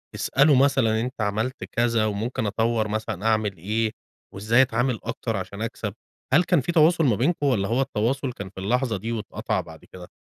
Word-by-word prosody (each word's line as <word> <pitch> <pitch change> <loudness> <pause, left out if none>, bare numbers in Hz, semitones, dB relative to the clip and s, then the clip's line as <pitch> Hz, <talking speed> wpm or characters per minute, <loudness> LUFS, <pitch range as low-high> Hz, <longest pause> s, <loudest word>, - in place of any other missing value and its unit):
تسأله 140 +1 +3
مثلًا 135 -3 +3
إن 120 - -1
أنت 130 -2 -6
عملت 110 +5 -2
كذا 115 -2 +1
وممكن 110 +3 -2
أطوّر 110 +1 0
مثلًا 110 -2 -4
أعمل 110 -3 +1
إيه؟ 110 +6 -1 0.4
وإزاي 110 +6 +3
أتعامل 125 -1 +1
أكتر 115 -4 -3
عشان 100 +3 -6
أكسب؟ 105 -3 -4 0.4
هل 175 +6 +6
كان 175 -6 +2
في 170 - -2
تواصل 165 0 +4
ما 120 - +3
بينكم 145 - 0
والّا 110 -8 +1
هو 120 +5 +1
التواصل 130 +2 -1
كان 100 -4 -7
في 95 - -11
اللحظة 115 +3 0
دي 110 +5 -5
واتقطع 110 -3 -2
بعد - - -14
كده؟ 90 -1 -12
115 Hz, 190 wpm, -24 LUFS, 105-130 Hz, 0.4 s, هل